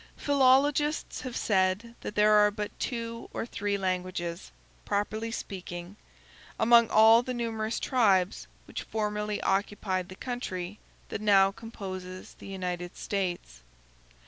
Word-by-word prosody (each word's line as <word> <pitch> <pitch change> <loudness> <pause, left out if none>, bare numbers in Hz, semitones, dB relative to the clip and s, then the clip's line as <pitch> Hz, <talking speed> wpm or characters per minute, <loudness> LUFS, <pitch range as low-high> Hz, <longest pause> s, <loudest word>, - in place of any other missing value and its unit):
Philologists 285 +2 +2
have 255 -2 -5
said 195 +3 +1
that - - -6
there 210 0 +5
are 210 0 +6
but 210 0 -4
two 230 -2 -4
or - - -2
three 205 -3 -2
languages, 180 - -3 0.3
properly 215 +2 -2
speaking, 180 -3 -6 0.6
among 235 0 +6
all 220 +2 +7
the 250 0 -4
numerous 225 -1 -2
tribes 200 -7 +2 0.2
which - - -6
formerly 210 -1 -2
occupied 195 -1 -1
the 185 - -9
country 205 -6 -5 0.3
that - - -4
now 195 -2 +5
composes 185 -4 -8
the - - -10
United 180 -2 -4
States. 175 - -3
210 Hz, 120 wpm, -29 LUFS, 185-230 Hz, 0.6 s, all